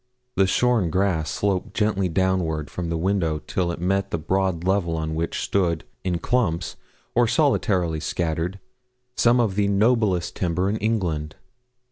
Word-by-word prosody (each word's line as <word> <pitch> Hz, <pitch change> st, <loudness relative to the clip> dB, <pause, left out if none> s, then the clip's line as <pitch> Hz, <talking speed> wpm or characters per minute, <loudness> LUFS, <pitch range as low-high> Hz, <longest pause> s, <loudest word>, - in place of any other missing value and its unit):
The 95 Hz, 0 st, +4 dB
shorn 120 Hz, -4 st, +2 dB
grass 90 Hz, -3 st, 0 dB
sloped 100 Hz, -3 st, -1 dB
gently 105 Hz, -4 st, +1 dB
downward 85 Hz, -4 st, 0 dB
from 90 Hz, -2 st, -4 dB
the 85 Hz, -, -1 dB
windows 85 Hz, -4 st, 0 dB
till 90 Hz, +1 st, -1 dB
it 85 Hz, -, -6 dB
met 95 Hz, +3 st, 0 dB
the -, -, -1 dB
broad 95 Hz, +1 st, 0 dB
level 90 Hz, -3 st, +1 dB
on 80 Hz, 0 st, -2 dB
which 80 Hz, +1 st, -2 dB
stood, 85 Hz, -5 st, 0 dB, 0.2 s
in 90 Hz, -2 st, 0 dB
clumps, 85 Hz, -7 st, 0 dB, 0.4 s
or 120 Hz, -1 st, +3 dB
solitarily 95 Hz, -, +1 dB
scattered, 85 Hz, +4 st, -2 dB, 0.6 s
some 120 Hz, +1 st, +4 dB
of 110 Hz, -5 st, +2 dB
the 100 Hz, +1 st, +1 dB
noblest 100 Hz, -3 st, +2 dB
timber 90 Hz, +1 st, 0 dB
in 110 Hz, -, -1 dB
England. 85 Hz, -9 st, -1 dB
95 Hz, 150 wpm, -24 LUFS, 85-100 Hz, 0.6 s, The